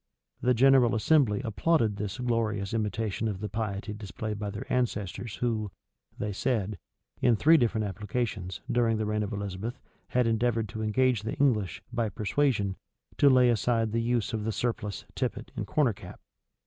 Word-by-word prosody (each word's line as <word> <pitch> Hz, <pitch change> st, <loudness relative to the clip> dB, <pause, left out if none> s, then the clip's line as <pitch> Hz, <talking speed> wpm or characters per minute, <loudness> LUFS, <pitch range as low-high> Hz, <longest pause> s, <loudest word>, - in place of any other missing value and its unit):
The 125 Hz, 0 st, +3 dB
general 130 Hz, -1 st, +5 dB
assembly 120 Hz, -2 st, +3 dB
applauded 115 Hz, -1 st, +1 dB
this 105 Hz, -1 st, -4 dB
glorious 115 Hz, -5 st, -1 dB
imitation 110 Hz, 0 st, -1 dB
of 100 Hz, -4 st, -3 dB
the 105 Hz, -, -3 dB
piety 105 Hz, 0 st, -3 dB
displayed 105 Hz, +1 st, -5 dB
by 105 Hz, -1 st, -3 dB
their -, -, -6 dB
ancestors 115 Hz, -3 st, -2 dB
who, 110 Hz, -4 st, -1 dB, 0.5 s
they 105 Hz, -1 st, -3 dB
said, 105 Hz, -2 st, -1 dB, 0.4 s
in 120 Hz, -, +4 dB
three 155 Hz, +10 st, +5 dB
different 115 Hz, -6 st, +2 dB
applications, 105 Hz, -3 st, -3 dB
during 115 Hz, -2 st, +2 dB
the 110 Hz, -, -1 dB
reign 105 Hz, 0 st, 0 dB
of 105 Hz, 0 st, -3 dB
Elizabeth, 100 Hz, +3 st, -4 dB, 0.3 s
had 125 Hz, -1 st, +2 dB
endeavored 115 Hz, 0 st, +1 dB
to 110 Hz, +3 st, -5 dB
engage 125 Hz, +2 st, +2 dB
the 110 Hz, -, -4 dB
English, 115 Hz, -9 st, +1 dB
by 115 Hz, -2 st, 0 dB
persuasion, 105 Hz, -1 st, 0 dB, 0.4 s
to 140 Hz, -, +7 dB
lay 125 Hz, -2 st, +6 dB
aside 115 Hz, -1 st, +1 dB
the 115 Hz, +1 st, +1 dB
use 120 Hz, -1 st, 0 dB
of 110 Hz, -1 st, -2 dB
the 110 Hz, -, -1 dB
surplice, 105 Hz, -2 st, -3 dB
tippet, -, -, -3 dB
and -, -, -4 dB
corner 140 Hz, -7 st, +2 dB
cap. -, -, -11 dB
110 Hz, 165 wpm, -28 LUFS, 105-120 Hz, 0.5 s, to